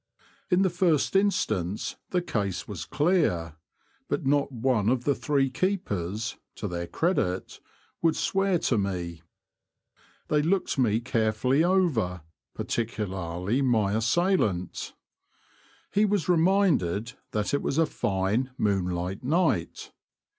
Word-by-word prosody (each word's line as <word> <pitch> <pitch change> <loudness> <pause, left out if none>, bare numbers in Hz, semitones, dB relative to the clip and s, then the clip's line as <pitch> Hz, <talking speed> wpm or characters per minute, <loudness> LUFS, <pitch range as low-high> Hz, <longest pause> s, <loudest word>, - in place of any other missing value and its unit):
In 185 0 +4
the 190 - +2
first 175 -2 +1
instance 110 - 0
the 180 -1 0
case 100 - -2
was 90 -5 -6
clear, 120 - +1 0.5
but 160 - -1
not 140 +1 +2
one 120 -4 +1
of 125 0 +1
the 140 - +2
three 140 -2 0
keepers 110 - -2 0.2
(to 105 - -4
their 85 -2 -4
credit) 95 - -1 0.4
would 165 -1 +3
swear 195 -1 +1
to 120 -8 +1
me. 90 -4 -3 1.1
They 150 -1 +2
looked 175 -2 0
me 115 -3 +2
carefully 120 +4 +1
over, 150 - +1 0.3
par - - -4
ticularly 100 -1 -2
my 110 -6 +2
assailant. 110 - 0 1.0
He 210 +1 +3
was 205 -5 0
reminded 165 - +2 0.2
that 105 +3 -2
it 140 - +2
was 140 - -1
a 165 - +5
fine, 100 0 -1
moonlight 95 -1 -1
night. 145 - 0
120 Hz, 120 wpm, -27 LUFS, -, 1.1 s, a